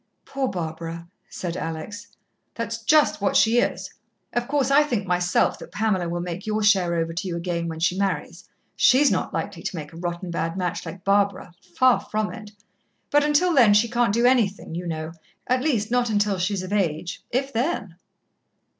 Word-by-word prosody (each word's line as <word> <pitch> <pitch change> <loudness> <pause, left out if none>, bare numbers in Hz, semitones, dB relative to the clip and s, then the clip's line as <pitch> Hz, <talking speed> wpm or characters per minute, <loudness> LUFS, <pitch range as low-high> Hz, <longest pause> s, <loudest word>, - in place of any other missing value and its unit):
"Poor 270 -1 -2
Barbara," 165 -2 -5 0.2
said 175 -2 -5
Alex. 165 +8 -5 0.5
"That's 230 0 -4
just 305 -2 +3
what 200 - +1
she 230 +2 +5
is. - - -2 0.4
Of 240 0 -1
course, 275 -2 +1
I 285 +2 +7
think 240 -9 -1
myself 180 0 +1
that - - -11
Pamela 195 -5 0
will 175 0 -2
make 175 +3 -6
your 215 0 0
share 190 -5 +3
over 165 0 -1
to 175 +3 -4
you 175 - -3
again 170 -1 -2
when 160 -1 -5
she 175 +2 +1
marries. 180 -2 -3 0.3
She's 275 +3 +5
not - - -1
likely - - -4
to - - -4
make 150 -1 -7
a - - -10
rotten 175 +1 -4
bad 165 +1 -2
match 180 -2 -3
like 185 0 -8
Barbara 200 -2 +1 0.2
far 255 -1 +5
from 215 0 -3
it. 220 -2 -9 0.6
But 290 0 +4
until 300 +4 +3
then 235 -8 +6
she 215 +3 +4
can't 235 -2 +1
do 235 +3 +2
anything, 225 -9 +2
you 175 +1 -4
know 160 -1 -4 0.3
at 255 0 +1
least, 235 -7 0
not 245 -1 +2
until 205 -2 +1
she's 185 +1 -1
of 185 +2 -5
age, 170 -4 -1
if 270 +3 -2
then." 230 - -1
200 Hz, 190 wpm, -24 LUFS, 175-235 Hz, 0.6 s, I